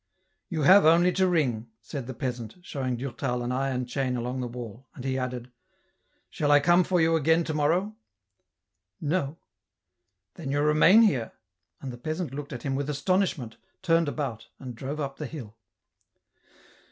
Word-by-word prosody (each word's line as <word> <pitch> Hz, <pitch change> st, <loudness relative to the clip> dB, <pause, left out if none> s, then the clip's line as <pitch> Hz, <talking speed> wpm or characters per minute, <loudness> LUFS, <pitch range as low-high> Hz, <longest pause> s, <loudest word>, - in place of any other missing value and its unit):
" -, -, -49 dB
You 160 Hz, -4 st, -2 dB
have 195 Hz, +7 st, +8 dB
only 170 Hz, +3 st, +5 dB
to 190 Hz, 0 st, +2 dB
ring," 125 Hz, -10 st, 0 dB
said 120 Hz, +3 st, -7 dB
the 130 Hz, -, -6 dB
peasant, 120 Hz, -3 st, -4 dB
showing 130 Hz, -7 st, -3 dB
Durtal 125 Hz, -1 st, -3 dB
an 120 Hz, -, -2 dB
iron 130 Hz, -1 st, -1 dB
chain 125 Hz, 0 st, -2 dB
along 125 Hz, +2 st, -3 dB
the 125 Hz, -, -3 dB
wall; 120 Hz, +1 st, -9 dB
and 125 Hz, -, -8 dB
he 130 Hz, -1 st, 0 dB
added, 125 Hz, -1 st, -4 dB, 0.4 s
'* -, -, -45 dB
Shall 145 Hz, -, -1 dB
I 145 Hz, 0 st, +7 dB
come 175 Hz, +4 st, +4 dB
for 180 Hz, 0 st, +1 dB
you 165 Hz, 0 st, +3 dB
again 160 Hz, +2 st, +3 dB
to 160 Hz, -, -3 dB
morrow? 170 Hz, +8 st, +1 dB, 0.4 s
" -, -, -54 dB
" -, -, -57 dB
No." 165 Hz, -4 st, -1 dB, 0.5 s
" 95 Hz, +1 st, -55 dB
Then 155 Hz, -5 st, -7 dB
you 145 Hz, +1 st, 0 dB
remain 155 Hz, +9 st, +6 dB
here? 130 Hz, -, +1 dB, 0.2 s
" 85 Hz, -, -48 dB
and 130 Hz, -2 st, -6 dB
the 120 Hz, -, -10 dB
peasant 155 Hz, +1 st, -4 dB
looked 145 Hz, +1 st, -6 dB
at 125 Hz, -4 st, -7 dB
him 135 Hz, -, -1 dB
with 140 Hz, +1 st, -2 dB
astonishment, 150 Hz, -, 0 dB, 0.3 s
turned 165 Hz, -3 st, +3 dB
about, 135 Hz, -7 st, -4 dB
and 130 Hz, -2 st, -8 dB
drove 140 Hz, +6 st, -5 dB
up 135 Hz, -2 st, -4 dB
the 150 Hz, -, -5 dB
hill. 120 Hz, -8 st, -9 dB
135 Hz, 190 wpm, -27 LUFS, 125-160 Hz, 0.5 s, have